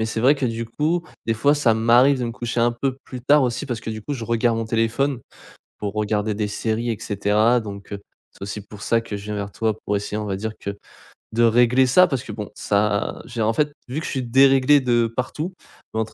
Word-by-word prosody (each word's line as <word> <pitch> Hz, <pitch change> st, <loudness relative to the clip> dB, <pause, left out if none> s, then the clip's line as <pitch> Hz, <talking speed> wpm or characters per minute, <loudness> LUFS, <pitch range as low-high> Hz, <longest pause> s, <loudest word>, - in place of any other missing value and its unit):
mais 110 Hz, -, 0 dB
c'est 110 Hz, 0 st, -3 dB
vrai 130 Hz, +5 st, +5 dB
que, 140 Hz, -3 st, -1 dB
du 115 Hz, 0 st, -3 dB
coup, 160 Hz, +8 st, -1 dB, 0.2 s
des 115 Hz, -, +1 dB
fois, 140 Hz, +7 st, +3 dB
ça 120 Hz, -7 st, +3 dB
m'arrive 120 Hz, +5 st, +4 dB
de 125 Hz, -, -2 dB
me 115 Hz, -, -3 dB
coucher 120 Hz, 0 st, -4 dB
un 120 Hz, +1 st, +3 dB
peu 130 Hz, +2 st, -2 dB
plus 125 Hz, -, -8 dB
tard 145 Hz, +3 st, +4 dB
aussi 125 Hz, +3 st, -2 dB
parce 120 Hz, -3 st, -3 dB
que, 110 Hz, -, -5 dB
du 110 Hz, -1 st, -6 dB
coup, 145 Hz, -, -4 dB
je 115 Hz, -4 st, -5 dB
regarde 115 Hz, 0 st, +1 dB
mon 115 Hz, -, -1 dB
téléphone 115 Hz, +4 st, 0 dB, 0.6 s
pour 100 Hz, -1 st, -4 dB
regarder 105 Hz, 0 st, 0 dB
des 105 Hz, 0 st, -2 dB
séries 110 Hz, +2 st, -2 dB
et 115 Hz, -, -1 dB
cetera, 105 Hz, +4 st, +2 dB
donc 100 Hz, -1 st, -8 dB
heu, 100 Hz, -, -6 dB, 0.3 s
c'est -, -, -23 dB
aussi 100 Hz, +1 st, -5 dB
pour 105 Hz, -2 st, -12 dB
ça 115 Hz, +1 st, +2 dB
que 115 Hz, -2 st, -6 dB
je 100 Hz, -, -7 dB
viens 105 Hz, 0 st, -4 dB
vers 100 Hz, 0 st, -4 dB
toi 110 Hz, -2 st, -1 dB
pour 105 Hz, -, 0 dB
essayer, 105 Hz, +1 st, -3 dB
on 105 Hz, -, -3 dB
va 100 Hz, -2 st, -2 dB
dire 110 Hz, +3 st, -4 dB
que 100 Hz, -, -4 dB, 0.6 s
de 115 Hz, +1 st, 0 dB
régler 120 Hz, +3 st, +4 dB
ça, 180 Hz, +9 st, +6 dB
parce 135 Hz, -5 st, -2 dB
que -, -, -8 dB
bon 105 Hz, -1 st, -6 dB
ça 105 Hz, 0 st, +1 dB
a -, -, -5 dB
j'ai 120 Hz, -2 st, -5 dB
en 110 Hz, +1 st, +2 dB
fait, 150 Hz, +4 st, +1 dB, 0.2 s
vu 135 Hz, +5 st, -3 dB
que -, -, -6 dB
je -, -, -4 dB
suis 130 Hz, -, -1 dB
déréglé 135 Hz, +3 st, +5 dB
de 120 Hz, -2 st, +2 dB
partout, 150 Hz, +8 st, -3 dB, 0.4 s
entre 110 Hz, 0 st, -2 dB
115 Hz, 255 wpm, -22 LUFS, 105-130 Hz, 0.6 s, ça